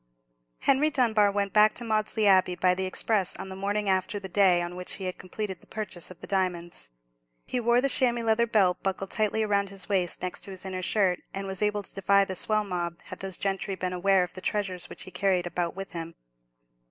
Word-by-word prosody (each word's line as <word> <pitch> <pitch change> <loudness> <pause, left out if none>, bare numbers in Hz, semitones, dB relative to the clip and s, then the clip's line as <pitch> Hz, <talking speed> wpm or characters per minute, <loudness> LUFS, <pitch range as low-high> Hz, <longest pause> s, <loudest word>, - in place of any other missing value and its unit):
Henry 285 +3 +3
Dunbar 225 -7 +3
went 200 -1 -1
back 215 0 +6
to 240 - -2
Maudesley 215 -1 0
Abbey 185 -2 +5
by 180 0 +3
the 190 +1 -1
express 195 0 0
on 190 - -7
the 190 - -6
morning 205 +2 -1
after 190 +2 +1
the 195 - -7
day 185 -2 +4
on 175 0 -4
which 180 0 -3
he 195 - -5
had 185 -1 -4
completed 190 +1 -5
his - - -22
purchase 205 -5 -4
of 185 - -13
the - - -7
diamonds. 175 - -2 0.6
He 250 - -2
wore 240 +1 +3
the 275 - +2
chamois 245 -3 +2
leather 225 +1 +2
belt 195 -5 +2
buckled 195 0 -3
tightly 215 0 +1
round 200 -1 +1
his 195 0 -2
waist 185 -4 0
next 180 - -3
to - - -7
his 190 0 -7
inner 185 -1 -4
shirt, 185 -1 +2 0.2
and 195 0 -3
was 190 0 -4
able 210 -1 +1
to - - -10
defy 200 0 +3
the 190 - -4
swell 215 +3 +2
mob, 175 -3 -3
had - - -9
those 190 -2 -2
gentry 195 0 -2
been 185 -1 -3
aware 190 +1 +3
of 180 - -6
the 185 - -8
treasures 185 -3 -1
which - - -9
he 185 - -11
carried 185 -1 +1
about 175 -1 -2
with 195 0 -6
him. 165 -1 -6
195 Hz, 225 wpm, -27 LUFS, 185-210 Hz, 0.6 s, back